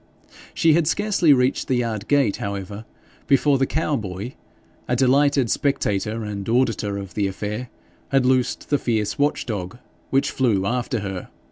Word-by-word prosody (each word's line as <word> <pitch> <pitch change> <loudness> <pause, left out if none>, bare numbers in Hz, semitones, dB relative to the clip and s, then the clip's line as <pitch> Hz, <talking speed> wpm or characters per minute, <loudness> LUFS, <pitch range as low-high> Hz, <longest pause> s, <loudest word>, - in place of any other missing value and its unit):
She 160 -1 +4
had 165 -1 +2
scarcely 195 -3 +2
reached 130 -1 +2
the 130 - +1
yard 115 -4 -2
gate, 140 -8 +2
however, 100 +2 -5 0.4
before 140 0 +3
the 135 - +2
cow 155 -1 0
boy, 105 +1 -5 0.5
a 125 - +1
delighted 135 0 +3
spectator 110 -5 0
and 100 -1 -5
auditor 115 -4 +1
of 95 -3 -7
the 100 0 0
affair, 105 +5 -4 0.4
had 135 -2 +2
loosed 130 +1 0
the 145 - +3
fierce 110 -1 -1
watch 145 +1 +1
dog, 100 -2 -4 0.3
which 140 +2 +1
flew 110 -9 +1
after 120 0 -1
her. 95 -2 -5
120 Hz, 155 wpm, -22 LUFS, 100-135 Hz, 0.5 s, She